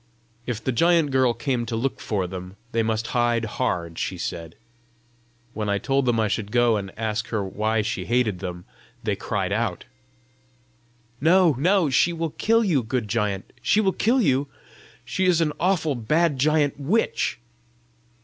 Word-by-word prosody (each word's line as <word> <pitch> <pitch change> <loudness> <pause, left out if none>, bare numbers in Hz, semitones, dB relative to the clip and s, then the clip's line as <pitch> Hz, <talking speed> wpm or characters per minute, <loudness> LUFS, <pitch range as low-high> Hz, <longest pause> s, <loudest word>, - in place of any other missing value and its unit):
If 115 -3 -3
the 130 - 0
giant 165 +3 +3
girl 130 -3 +3
came 120 +1 -1
to 115 - -3
look 130 +4 -2
for 100 -4 -2
them, 90 +1 -7 0.2
they 115 - +1
must 110 0 -1
hide 120 -1 +2
hard, 85 -8 -2
she 95 - -3
said. 85 -1 -5 1.0
When 105 -1 -3
I 100 - +2
told 135 +4 0
them 120 -2 +2
I 110 - +2
should 105 0 -3
go 120 -1 +3
and 100 -2 -4
ask 110 0 -2
her 110 -3 -2
why 110 +3 -1
she 110 - -3
hated 115 -6 +1
them, 90 -2 -6 0.4
they - - 0
cried 95 -2 -2
out, 105 -3 -1 1.4
"No, 170 0 +5
no! 180 -1 +3
she 170 +6 +3
will 165 -1 -3
kill 230 +7 +2
you, 165 - +2
good 120 -1 -2
giant; 105 -3 -2
she 210 - +3
will 195 -3 +2
kill 245 +5 +2
you! 140 - +2 0.6
She 190 - -1
is 175 -2 +4
an 155 -3 +1
awful 175 -4 +1
bad 145 +5 +1
giant 150 0 +2
witch!" 185 +12 0
120 Hz, 170 wpm, -24 LUFS, 105-155 Hz, 1.4 s, No